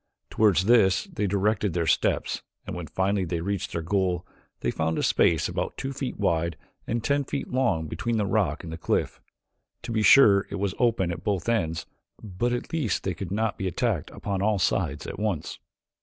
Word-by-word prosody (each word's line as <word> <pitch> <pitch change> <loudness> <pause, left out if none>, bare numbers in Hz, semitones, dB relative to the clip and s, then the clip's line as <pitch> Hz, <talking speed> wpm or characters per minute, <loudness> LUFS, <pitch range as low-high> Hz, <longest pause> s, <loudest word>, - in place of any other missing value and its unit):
Toward 105 -4 +4
this 95 +2 +4
they 175 - -3
directed 100 0 +1
their 85 -1 0
steps 80 - +1 0.2
and - - -5
when 90 -2 -5
finally 95 +1 0
they 85 -1 -2
reached 100 +2 -2
their 85 - -3
goal 90 -1 0 0.4
they - - 0
found 80 0 -1
a - - 0
space 80 -3 +3
about - - -3
two 135 +1 -4
feet 135 -1 -4
wide 85 -4 0 0.3
and 115 -1 -1
ten 140 +3 +1
feet 140 +1 -4
long 125 -11 +1
between 115 +9 -2
the 105 - +1
rock 100 - 0
and 80 - -7
the - - -7
cliff. - - -1 0.6
To 120 - -5
be 110 -1 +1
sure 105 -4 +7
it - - -4
was 100 -1 -1
open 115 -8 +2
at 85 -1 -6
both 100 -2 -1
ends 85 -9 0 0.3
but 110 +3 -2
at 120 +5 -4
least 150 -10 0
they 95 - -1
could 90 +1 -6
not 110 +1 -1
be 95 - -1
attacked 90 - -1
upon 100 -2 -3
all 105 0 +2
sides 75 -5 0
at - - -6
once. 105 -7 -2
100 Hz, 200 wpm, -26 LUFS, 85-115 Hz, 0.6 s, sure